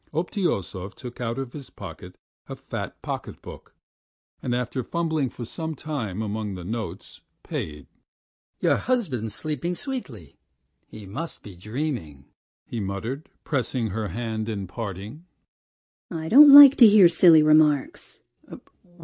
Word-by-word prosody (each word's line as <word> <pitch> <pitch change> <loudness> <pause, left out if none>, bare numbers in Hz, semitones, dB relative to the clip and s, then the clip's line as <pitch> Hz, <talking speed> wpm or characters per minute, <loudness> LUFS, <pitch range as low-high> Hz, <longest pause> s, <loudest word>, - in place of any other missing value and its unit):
Obtyosov 150 - -2
took 125 -1 -10
out 115 0 -3
of 135 -2 -5
his 140 -4 -9
pocket - - -11 0.3
a - - -5
fat - - -7
pocket - - -6
book, - - -12 0.7
and 120 - -2
after 125 +1 -3
fumbling 160 -4 -1
for 120 - -8
some 160 +5 -5
time 115 -10 -4
among 105 -1 -4
the 90 - -8
notes, 110 +4 -6 0.2
paid. 75 -1 -6 0.7
"Your - - +2
husband's 135 - -2
sleeping 155 +3 -3
sweetly... 150 - -7 0.5
he 105 -2 -12
must 155 - -7
be 100 -3 -11
dreaming," 105 - -5 0.4
he 120 - -6
muttered, 110 +9 -5
pressing 125 -4 -2
her 110 +2 -3
hand 110 0 -4
at 100 -3 -4
parting. 110 - -7 0.8
"I 160 -2 -5
don't 290 +4 +9
like 285 -1 +11
to 235 - +9
hear 205 -3 +7
silly 165 -2 +6
remarks. 150 -2 +2
125 Hz, 130 wpm, -24 LUFS, 105-160 Hz, 0.8 s, like